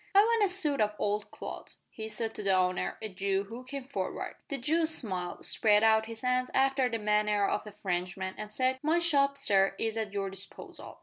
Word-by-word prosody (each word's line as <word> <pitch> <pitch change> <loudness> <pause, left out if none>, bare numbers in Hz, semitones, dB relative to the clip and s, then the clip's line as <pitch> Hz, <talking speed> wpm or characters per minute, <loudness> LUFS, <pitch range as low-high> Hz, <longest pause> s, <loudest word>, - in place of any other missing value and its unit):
"I - - +9
want 455 0 +3
a 400 - +3
suit 310 - +4
of 210 0 +1
old 210 0 -1
clothes," - - -8
he 220 -1 -6
said 225 0 -1
to - - -5
the 195 -1 +2
owner, 185 0 0
a - - -2
Jew, 195 0 -1
who 235 +3 -8
came 275 +1 -6
forward. 270 +2 -4
The 280 - -2
Jew 315 +6 +1
smiled, 185 - -2
spread 210 -1 +3
out 220 0 +4
his 225 -1 -7
hands 250 0 +1
after 270 -1 +3
the 230 - -2
manner 210 -1 +2
of 210 - -2
a - - -7
Frenchman, 185 -1 -3
and 210 0 -7
said, 255 +3 0
"My 315 +3 +2
shop, 280 -5 +3
sir, 195 -7 +3
is 225 0 -2
at 220 -2 -2
your 195 -1 -2
disposal." 195 +1 -6
220 Hz, 210 wpm, -30 LUFS, 200-270 Hz, -, I